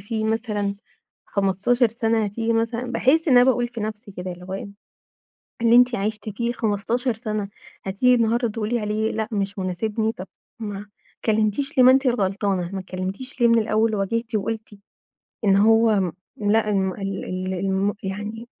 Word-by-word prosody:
فيه 220 Hz, +2 st, -3 dB
مثلًا 215 Hz, -3 st, -1 dB, 0.5 s
15 205 Hz, +5 st, +2 dB
سنة 225 Hz, -1 st, 0 dB
هتيجي 225 Hz, +3 st, -1 dB
مثلًا 230 Hz, +2 st, -1 dB
باحس 290 Hz, +8 st, +3 dB
إن 255 Hz, -, +6 dB
أنا 245 Hz, -, +7 dB
باقول 245 Hz, -2 st, +2 dB
في 235 Hz, -1 st, -7 dB
نفسي 215 Hz, 0 st, -5 dB
كده 180 Hz, 0 st, -5 dB
اللي 180 Hz, +1 st, -11 dB
هو 190 Hz, +1 st, -5 dB
إيه، 195 Hz, -, -5 dB, 0.9 s
اللي 230 Hz, 0 st, +6 dB
أنتِ 250 Hz, 0 st, +5 dB
عشتِ 215 Hz, +1 st, -3 dB
فيه 235 Hz, +3 st, -2 dB
15 230 Hz, +3 st, -1 dB
سنة، 215 Hz, -2 st, -3 dB, 0.4 s
هتيجي 205 Hz, +7 st, +3 dB
النهاردة 235 Hz, +1 st, +2 dB
تقولي 225 Hz, +2 st, -2 dB
عليه 215 Hz, +1 st, -1 dB
لأ 220 Hz, 0 st, -2 dB
مش 200 Hz, -1 st, -2 dB
مناسبني؟ 215 Hz, +4 st, -1 dB
طب 185 Hz, -2 st, -9 dB, 0.3 s
ما 205 Hz, -2 st, -5 dB, 0.3 s
اتكلمتيش 220 Hz, +6 st, 0 dB
ليه، 255 Hz, -, +8 dB
ما 255 Hz, -, +9 dB
أنتِ 265 Hz, +1 st, +3 dB
الغلطانة، 195 Hz, -5 st, 0 dB
ما 195 Hz, -, -3 dB
اتكلمتيش 190 Hz, +8 st, -6 dB
ليه 235 Hz, -, +6 dB
من 230 Hz, 0 st, +5 dB
الأول 220 Hz, 0 st, +1 dB
وواجهتِ 225 Hz, +4 st, -2 dB
وقلتِ 215 Hz, 0 st, -3 dB, 0.7 s
إن 195 Hz, -1 st, +5 dB
هو 215 Hz, -3 st, +4 dB, 0.3 s
لأ، 215 Hz, +1 st, +2 dB
الم 190 Hz, -2 st, +1 dB
ال 195 Hz, -1 st, -4 dB
ال 185 Hz, +1 st, -3 dB
الم 195 Hz, +2 st, 0 dB
يعني 210 Hz, +4 st, -5 dB
215 Hz, 165 wpm, -23 LUFS, 195-230 Hz, 0.9 s, ما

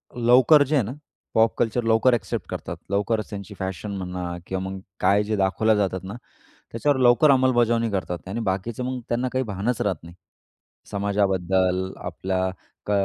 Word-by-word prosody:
लवकर 125 Hz, +5 st, +6 dB
जे 145 Hz, +2 st, -1 dB
आहे 135 Hz, -, +3 dB
ना, 110 Hz, -, -5 dB, 0.4 s
पॉप 110 Hz, 0 st, +4 dB
कल्चर, 120 Hz, +1 st, 0 dB
लवकर 115 Hz, +3 st, +4 dB
एक्सेप्ट 100 Hz, -6 st, -2 dB
करतात. -, -, -5 dB
लवकरच 105 Hz, +2 st, 0 dB
त्यांची 100 Hz, 0 st, -7 dB
फॅशन 95 Hz, +2 st, -4 dB
म्हणा 90 Hz, -1 st, -5 dB, 0.2 s
किंवा 95 Hz, 0 st, -3 dB
मग 95 Hz, 0 st, -6 dB, 0.2 s
काय 100 Hz, +3 st, +3 dB
जे 110 Hz, +1 st, -1 dB
दाखवल्या 105 Hz, +3 st, +2 dB
जातात 95 Hz, -3 st, -1 dB
ना 95 Hz, +2 st, -6 dB, 0.6 s
त्याच्यावर 140 Hz, +5 st, +1 dB
लवकर 125 Hz, +4 st, +5 dB
अंमलबजावणी 120 Hz, -3 st, +3 dB
करतात. 95 Hz, -3 st, -2 dB
आणि 110 Hz, +5 st, -3 dB
बाकीचे 105 Hz, +6 st, -3 dB
मग 130 Hz, 0 st, -3 dB
त्यांना 125 Hz, +2 st, 0 dB
काही 130 Hz, 0 st, 0 dB
भानच 105 Hz, +2 st, -2 dB
राहत 100 Hz, -3 st, 0 dB
नाही. 85 Hz, +1 st, -12 dB, 0.8 s
समाजाबद्दल, 95 Hz, -2 st, 0 dB
आपल्या 95 Hz, +2 st, -2 dB, 0.4 s
क -, -, -4 dB
105 Hz, 160 wpm, -24 LUFS, 95-120 Hz, 0.8 s, लवकर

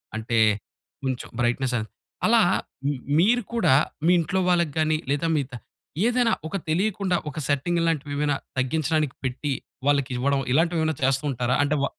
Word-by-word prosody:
అంటే 115 Hz, +1 st, -1 dB, 0.7 s
కొంచెం 130 Hz, -2 st, -3 dB
బ్రైట్‌నెస్ 125 Hz, +1 st, +1 dB
అది. 110 Hz, 0 st, -4 dB, 0.4 s
అలా -, -, +5 dB, 0.8 s
మీరు 240 Hz, +7 st, +4 dB
కూడా 230 Hz, -, +3 dB, 0.3 s
మీ 175 Hz, -, +5 dB
ఇంట్లో 185 Hz, +4 st, 0 dB
వాళ్ళకి 170 Hz, -5 st, +2 dB
గానీ 155 Hz, 0 st, +2 dB
లేదా 145 Hz, +3 st, 0 dB
మీ 145 Hz, -, +2 dB
ద -, -, -17 dB, 0.5 s
ఏదైనా 245 Hz, -1 st, +2 dB, 0.2 s
ఒక 180 Hz, -, -6 dB
తెలీకుండా 185 Hz, +1 st, +1 dB
ఒక 150 Hz, -, -6 dB
సెట్టింగ్ 160 Hz, +5 st, +1 dB
ఇలాంటివేమైనా 145 Hz, -3 st, 0 dB, 0.2 s
తగ్గించడానికి 150 Hz, +1 st, 0 dB
పెట్టి 130 Hz, +3 st, -2 dB, 0.4 s
వాళ్ళకివ్వడం 140 Hz, -1 st, +1 dB
ఇలాంటివేమైనా 160 Hz, -1 st, +2 dB
చేస్తుంటారా? 130 Hz, -2 st, +1 dB
అంటే 145 Hz, +1 st, +1 dB
వ -, -, +4 dB
150 Hz, 135 wpm, -25 LUFS, 135-170 Hz, 0.8 s, అలా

